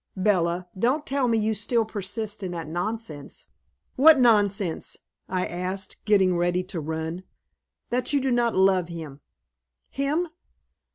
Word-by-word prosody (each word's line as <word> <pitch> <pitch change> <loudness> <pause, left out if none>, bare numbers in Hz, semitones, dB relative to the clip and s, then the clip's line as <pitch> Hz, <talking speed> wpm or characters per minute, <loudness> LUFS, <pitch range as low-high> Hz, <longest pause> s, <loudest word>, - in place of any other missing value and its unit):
"Bella, 180 -2 +1
don't 255 +10 +1
tell 275 -2 +1
me 230 -1 +2
you 220 0 +1
still 225 +2 0
persist 210 0 -4
in 185 -2 -4
that 165 -3 -5
nonsense." 175 -3 -5 0.5
"What 305 +2 +8
nonsense?" 205 -7 +2 0.3
I 185 -1 0
asked, 185 +2 -4
getting 190 -4 +4
ready 175 +1 +1
to 170 - -2
run. 160 +3 -4 0.7
"That 250 +1 0
you 285 - +3
do 265 -1 0
not 240 -2 +2
love 190 -2 +3
him." 160 -5 -8 0.7
"Him?" 300 +5 0
195 Hz, 135 wpm, -25 LUFS, 175-235 Hz, 0.7 s, What